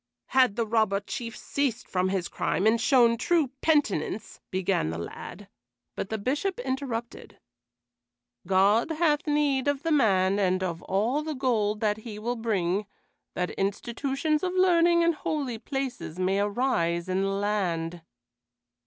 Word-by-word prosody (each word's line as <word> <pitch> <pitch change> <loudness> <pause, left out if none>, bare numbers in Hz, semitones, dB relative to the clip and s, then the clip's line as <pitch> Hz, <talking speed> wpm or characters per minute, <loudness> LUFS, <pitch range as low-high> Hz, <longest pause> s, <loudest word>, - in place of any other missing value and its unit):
"Had 255 -6 +4
the 230 -1 0
Robber 215 -3 +2
Chief 230 +2 -6
ceased 265 -4 -2
from 185 0 0
his 190 -2 -1
crime 190 - -1
and 225 +1 +3
shown 235 -1 +4
true 325 -1 +2
penitence" 220 - 0
began 185 - 0
the 80 - -4
lad, 175 - -8 0.5
but - - -4
the 220 - -2
Bishop 290 - -1
interrupted. 255 -3 -4 1.1
"God 200 - +3
hath 315 -2 +1
need 290 -3 +1
of 285 -1 0
the 330 - 0
man 195 -8 +3
and 185 -1 +1
of 170 -2 -3
all 225 +10 0
the 310 0 -4
gold 215 -6 0
that 210 -1 +1
he 220 -1 -8
will 235 +3 -2
bring, 205 -4 -1 0.5
that 180 0 -1
institutions 270 +9 -1
of 365 -1 -1
learning 345 -2 +4
and 335 0 +3
holy 285 -6 -3
places 265 - -4
may 185 +2 +1
arise 200 -6 0
in 185 +1 0
the 195 - +1
land." 185 -5 -1
225 Hz, 145 wpm, -27 LUFS, 195-275 Hz, 1.1 s, Had